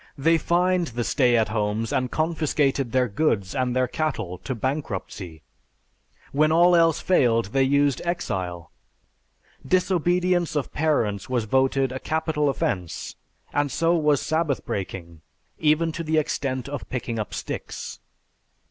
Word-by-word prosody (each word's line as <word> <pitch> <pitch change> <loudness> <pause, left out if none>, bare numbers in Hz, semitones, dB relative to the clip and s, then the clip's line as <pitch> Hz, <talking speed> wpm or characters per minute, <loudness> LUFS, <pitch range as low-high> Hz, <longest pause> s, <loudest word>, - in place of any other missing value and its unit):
They 165 +4 +3
fined 180 +1 +2
the 120 -1 -3
stay 125 -1 +3
at 110 - +2
homes 110 +1 -1
and 130 -1 0
confiscated 150 -5 0
their 130 0 +2
goods 100 -4 0
and 130 -2 -1
their 130 0 +2
cattle 115 - -3
to 130 - -4
bankruptcy. 100 - -4 0.9
When 155 +2 +3
all 175 +2 +5
else 165 -2 +4
failed 115 - +2
they 135 - +3
used 140 0 +2
exile. 90 - -3 0.9
Disobedience 180 -1 +1
of 145 - -2
parents 115 -11 0
was 125 -3 0
voted 135 +2 +2
a 130 - -4
capital 155 -1 0
offense 90 -9 -3 0.4
and 145 -1 +1
so 165 +5 +2
was 150 -4 +3
Sabbath 155 -4 -1
breaking 85 -4 -5 0.4
even 160 +2 +2
to 165 - -5
the 160 0 0
extent 135 -4 -1
of 145 -1 -6
picking 120 -2 -3
up 105 - -4
sticks. - - -6
135 Hz, 140 wpm, -24 LUFS, 115-160 Hz, 0.9 s, all